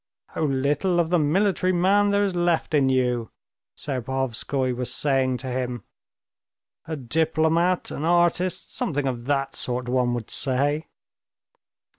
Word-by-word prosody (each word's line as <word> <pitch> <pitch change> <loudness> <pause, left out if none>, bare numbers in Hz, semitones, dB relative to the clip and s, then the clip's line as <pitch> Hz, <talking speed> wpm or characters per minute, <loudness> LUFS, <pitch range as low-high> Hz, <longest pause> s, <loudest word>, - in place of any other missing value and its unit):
"How 160 - -2
little 145 +6 +1
of 170 0 0
the 175 - +4
military 185 +4 +2
man 195 +3 +3
there 200 0 +2
is 195 -2 0
left 175 -2 0
in 140 -3 +3
you!" 125 -3 0 0.5
Serpuhovskoy 130 -1 -2
was 125 0 -3
saying 135 -3 +1
to 125 +2 -7
him. 125 -3 -3 1.0
"A 160 - -3
diplomat, 160 +6 +1
an 145 - -5
artist, 175 +1 +1
something 145 -2 -1
of 120 -3 -3
that 135 0 -1
sort, 125 0 -1
one 125 -1 +1
would 115 -3 -6
say." 145 +3 0
145 Hz, 135 wpm, -24 LUFS, 130-170 Hz, 1.0 s, the